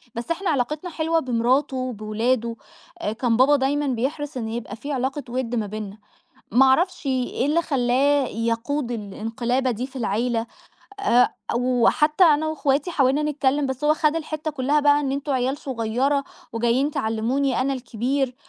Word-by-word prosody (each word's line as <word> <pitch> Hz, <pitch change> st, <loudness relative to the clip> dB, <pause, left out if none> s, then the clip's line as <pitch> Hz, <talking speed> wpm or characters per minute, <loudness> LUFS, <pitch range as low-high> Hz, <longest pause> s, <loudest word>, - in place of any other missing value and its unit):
بس 235 Hz, +6 st, -4 dB
إحنا 370 Hz, +3 st, -1 dB
علاقتنا 300 Hz, +5 st, -1 dB
حلوة 325 Hz, 0 st, 0 dB
بمراته 260 Hz, +1 st, +1 dB
وبأولاده، 230 Hz, 0 st, -1 dB, 0.6 s
كان 235 Hz, -3 st, +2 dB
بابا 270 Hz, +4 st, +5 dB
دايمًا 285 Hz, +1 st, 0 dB
بيحرص 275 Hz, +3 st, -2 dB
إنه 225 Hz, -2 st, -4 dB
يبقى 230 Hz, -3 st, -5 dB
في 285 Hz, +6 st, -7 dB
علاقة 270 Hz, +2 st, -2 dB
وُدّ 245 Hz, -1 st, -2 dB
ما 220 Hz, -3 st, -1 dB
بينَّا. 210 Hz, 0 st, -6 dB, 0.6 s
ما 265 Hz, +3 st, +6 dB
أعرفش 325 Hz, +5 st, +2 dB
إيه 260 Hz, -1 st, 0 dB
اللي 320 Hz, +4 st, +2 dB
خلَّاه 275 Hz, 0 st, +2 dB
يقود 235 Hz, +4 st, -2 dB
الانقلابة 230 Hz, +4 st, -2 dB
دي 245 Hz, +2 st, -3 dB
في 270 Hz, -, -14 dB
العيلة. 230 Hz, +1 st, -1 dB, 0.5 s
آآ، 250 Hz, -11 st, +3 dB, 0.2 s
وحتى 255 Hz, +7 st, +3 dB
أنا 310 Hz, -1 st, +4 dB
وأخواتي 295 Hz, 0 st, 0 dB
حاولنا 275 Hz, -2 st, +2 dB
نتكلَّم، 290 Hz, -1 st, +1 dB
بس 265 Hz, +2 st, -4 dB
هو 305 Hz, +1 st, +4 dB
خَد 310 Hz, 0 st, +1 dB
الحتَّة 310 Hz, -1 st, -3 dB
كلّها 290 Hz, +1 st, +1 dB
بقى 290 Hz, 0 st, +4 dB
إن: 275 Hz, -2 st, -1 dB
"أنتم 280 Hz, +1 st, -2 dB
عيال 260 Hz, +2 st, 0 dB
صغيرة 265 Hz, +2 st, -1 dB, 0.3 s
وجايين 240 Hz, +5 st, +1 dB
تعلِّموني 250 Hz, +3 st, 0 dB
أنا 270 Hz, +2 st, +1 dB
الكبير." 260 Hz, +1 st, -2 dB
265 Hz, 155 wpm, -23 LUFS, 235-290 Hz, 0.6 s, ما